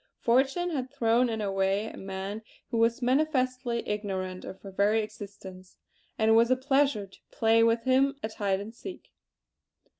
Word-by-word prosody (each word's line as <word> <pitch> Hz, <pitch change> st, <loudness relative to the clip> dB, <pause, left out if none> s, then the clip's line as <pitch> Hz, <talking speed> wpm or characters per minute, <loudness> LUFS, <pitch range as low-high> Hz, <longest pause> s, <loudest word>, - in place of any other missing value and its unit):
Fortune 270 Hz, +9 st, +2 dB
had 260 Hz, -5 st, -3 dB
thrown 245 Hz, -2 st, +2 dB
in 220 Hz, -1 st, -2 dB
her 200 Hz, -1 st, -1 dB
way 195 Hz, +2 st, +1 dB
a -, -, -7 dB
man 195 Hz, +2 st, -5 dB, 0.3 s
who 230 Hz, -, 0 dB
was 230 Hz, +2 st, +2 dB
manifestly 255 Hz, -3 st, 0 dB
ignorant 190 Hz, -3 st, -3 dB
of 190 Hz, -, -8 dB
her 195 Hz, -, -9 dB
very 210 Hz, +3 st, +2 dB
existence; 195 Hz, -3 st, -10 dB, 0.4 s
and 220 Hz, 0 st, +3 dB
it -, -, +7 dB
was 230 Hz, +1 st, +5 dB
a 255 Hz, -, +5 dB
pleasure 270 Hz, -4 st, +1 dB
to 195 Hz, -, -19 dB
play 225 Hz, 0 st, +3 dB
with 230 Hz, 0 st, +2 dB
him 270 Hz, +2 st, +3 dB
at 220 Hz, 0 st, -4 dB
hide 195 Hz, -2 st, 0 dB
and 210 Hz, +3 st, -8 dB
seek! 370 Hz, +10 st, -10 dB
225 Hz, 175 wpm, -28 LUFS, 200-255 Hz, 0.4 s, it